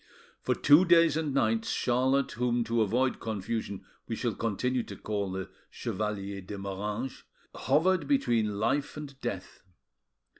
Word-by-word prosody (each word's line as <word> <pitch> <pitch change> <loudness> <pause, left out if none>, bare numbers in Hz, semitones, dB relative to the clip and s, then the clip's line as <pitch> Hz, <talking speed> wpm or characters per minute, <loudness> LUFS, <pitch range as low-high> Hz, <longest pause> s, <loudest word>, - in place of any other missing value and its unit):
For - - 0
two 150 +5 +6
days 170 -3 +5
and 155 -2 -1
nights, 115 -4 +1
Charlotte, 130 +3 +1
whom 120 0 0
to 115 0 0
avoid 125 +5 +1
confusion 110 -2 -4 0.2
we - - -2
shall - - -1
continue 125 +3 -1
to - - -8
call 100 -3 -3
the 95 0 -5 0.2
Chevalier 100 -2 -4
de 100 +2 -7
Moranges, 105 +6 -4 0.3
hovered 170 +7 +2
between 115 - +1
life 140 +8 0
and 140 -3 -9
death. 110 -6 -5
115 Hz, 140 wpm, -29 LUFS, 105-140 Hz, 0.3 s, two